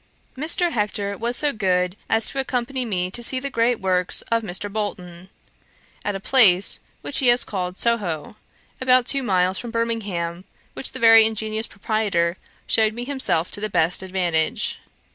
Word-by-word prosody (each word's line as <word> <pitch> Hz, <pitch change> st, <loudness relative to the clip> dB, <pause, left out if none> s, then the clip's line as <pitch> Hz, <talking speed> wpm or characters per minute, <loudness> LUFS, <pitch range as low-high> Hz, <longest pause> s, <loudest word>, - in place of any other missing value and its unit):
Mr. 335 Hz, +5 st, 0 dB
Hector 205 Hz, -3 st, -2 dB
was 235 Hz, +4 st, -2 dB
so 295 Hz, -1 st, +2 dB
good 180 Hz, -3 st, 0 dB
as 225 Hz, 0 st, +3 dB
to 275 Hz, -, -4 dB
accompany 255 Hz, -1 st, -2 dB
me 185 Hz, -4 st, -2 dB
to 240 Hz, -, -6 dB
see 255 Hz, +2 st, +2 dB
the 280 Hz, +1 st, -5 dB
great 235 Hz, 0 st, +1 dB
works 185 Hz, -1 st, 0 dB
of 230 Hz, 0 st, +2 dB
Mr. 195 Hz, -1 st, -3 dB
Bolton, 190 Hz, -4 st, -6 dB, 0.7 s
at 205 Hz, -, -2 dB
a -, -, -4 dB
place 200 Hz, -5 st, +5 dB, 0.2 s
which 285 Hz, -, -1 dB
he 260 Hz, -, +2 dB
has 240 Hz, 0 st, +4 dB
called 185 Hz, -2 st, -4 dB
Soho, 200 Hz, -9 st, -1 dB, 0.5 s
about 255 Hz, -1 st, +4 dB
two 275 Hz, +2 st, +2 dB
miles 185 Hz, -5 st, +1 dB
from 240 Hz, -, -6 dB
Birmingham, 205 Hz, -7 st, -3 dB, 0.3 s
which -, -, -4 dB
the -, -, -6 dB
very 225 Hz, -1 st, +7 dB
ingenious 220 Hz, 0 st, -2 dB
proprietor 200 Hz, -5 st, -1 dB, 0.3 s
shewed 220 Hz, -1 st, +2 dB
me 240 Hz, +1 st, -5 dB
himself 260 Hz, -, -1 dB
to 205 Hz, -, -7 dB
the 215 Hz, -, -2 dB
best 175 Hz, -1 st, +2 dB
advantage. 180 Hz, -4 st, -1 dB
215 Hz, 165 wpm, -22 LUFS, 185-240 Hz, 0.7 s, very